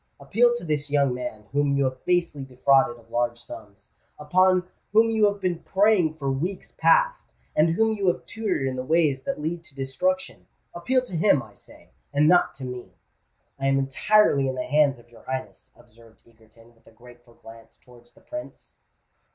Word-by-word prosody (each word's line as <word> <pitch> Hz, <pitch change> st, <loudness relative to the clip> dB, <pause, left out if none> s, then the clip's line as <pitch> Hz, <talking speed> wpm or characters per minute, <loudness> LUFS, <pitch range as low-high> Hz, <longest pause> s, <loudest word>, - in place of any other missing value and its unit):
"Appeal 240 Hz, +3 st, +2 dB
to 240 Hz, -, -6 dB
this 150 Hz, -2 st, -2 dB
young 140 Hz, -3 st, +2 dB
man 125 Hz, -4 st, -6 dB
whom 145 Hz, 0 st, +1 dB
you 140 Hz, -, +2 dB
have 130 Hz, -1 st, -3 dB
basely 170 Hz, -5 st, 0 dB
defrauded 135 Hz, -1 st, +2 dB
of 115 Hz, -1 st, -21 dB
large 120 Hz, 0 st, -1 dB
sums—upon 150 Hz, -, -2 dB, 0.3 s
whom 225 Hz, +1 st, +4 dB
you 220 Hz, -1 st, +3 dB
have 200 Hz, -, -9 dB
been 180 Hz, -3 st, -2 dB
preying 190 Hz, -6 st, +2 dB
for 140 Hz, -3 st, -3 dB
weeks 175 Hz, +9 st, -4 dB
past—and -, -, +1 dB
whom 220 Hz, +2 st, +2 dB
you 200 Hz, -2 st, -2 dB
have 175 Hz, -, 0 dB
tutored 215 Hz, -11 st, -2 dB
in 130 Hz, -, -3 dB
the 130 Hz, -, -4 dB
ways 150 Hz, -2 st, +1 dB
that 185 Hz, -, -4 dB
lead 165 Hz, +3 st, -4 dB
to 145 Hz, -, -17 dB
destruction:—appeal 185 Hz, -, -3 dB
to 215 Hz, -8 st, -8 dB
him, 160 Hz, -5 st, +3 dB
I -, -, -16 dB
say—and 145 Hz, +1 st, -4 dB
not 175 Hz, +1 st, +3 dB
to 135 Hz, -, -8 dB
me." 125 Hz, -1 st, -8 dB, 0.6 s
"I 135 Hz, -, -1 dB
am 135 Hz, 0 st, +2 dB
entirely 140 Hz, +2 st, +2 dB
in 130 Hz, -, -4 dB
the 125 Hz, -, -3 dB
hands 145 Hz, -1 st, +2 dB
of 120 Hz, 0 st, -21 dB
your 120 Hz, -, -17 dB
Highness," 130 Hz, 0 st, -6 dB
observed 115 Hz, -1 st, -21 dB
Egerton, 115 Hz, 0 st, -22 dB
with 115 Hz, -, -30 dB
a -, -, -17 dB
grateful 120 Hz, +1 st, -18 dB
glance 115 Hz, 0 st, -16 dB
towards 120 Hz, -1 st, -20 dB
the -, -, -22 dB
Prince. 305 Hz, +1 st, -10 dB
140 Hz, 175 wpm, -24 LUFS, 125-185 Hz, 0.6 s, whom